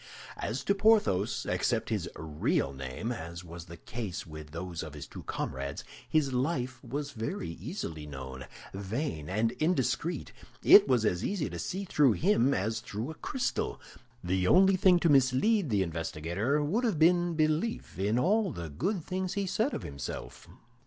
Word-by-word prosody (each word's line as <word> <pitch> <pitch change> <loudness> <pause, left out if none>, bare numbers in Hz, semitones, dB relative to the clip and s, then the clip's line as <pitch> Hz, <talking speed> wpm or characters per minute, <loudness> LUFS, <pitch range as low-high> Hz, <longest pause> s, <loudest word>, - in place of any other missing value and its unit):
As 115 +8 -3
to 200 - +3
Porthos, 195 - +3
except - - 0
his - - -1
real 75 -3 -1
name 65 - -4
(as 85 -5 -6
was 85 0 -9
the 85 0 -10
case 105 -4 -5
with 75 -2 -9
those 85 +2 -5
of 75 -2 -7
his 75 -1 -7
two - - -9
comrades), 70 +1 -4 0.3
his 145 -4 +2
life 125 -2 -1
was 140 +4 -4
very 110 - -4
easily 80 -2 -6
known. 65 -2 -7 0.3
Vain 95 - -3
and 110 +4 +1
indiscreet, 155 0 0 0.3
it - - +9
was 125 -4 +3
as 90 -4 +1
easy 185 - -1
to 85 - -5
see 190 - -3
through 145 - +4
him 140 - +3
as 110 -1 0
through 110 +5 -5
a 160 - -13
crystal. 260 - -2 0.4
The 90 +1 +1
only 190 - +6
thing 185 -1 +5
to - - +3
mislead 140 - +4
the 100 -4 +2
investigator 85 - -1
would 200 +12 0
have 220 -9 +1
been 175 +1 +4
belief 155 - 0
in 105 +4 +1
all 200 - +2
the 85 - -6
good 180 - -1
things 185 0 -2
he 200 -1 0
said 220 +8 0
of - - -5
himself. 70 0 -7
120 Hz, 165 wpm, -30 LUFS, -, 0.4 s, it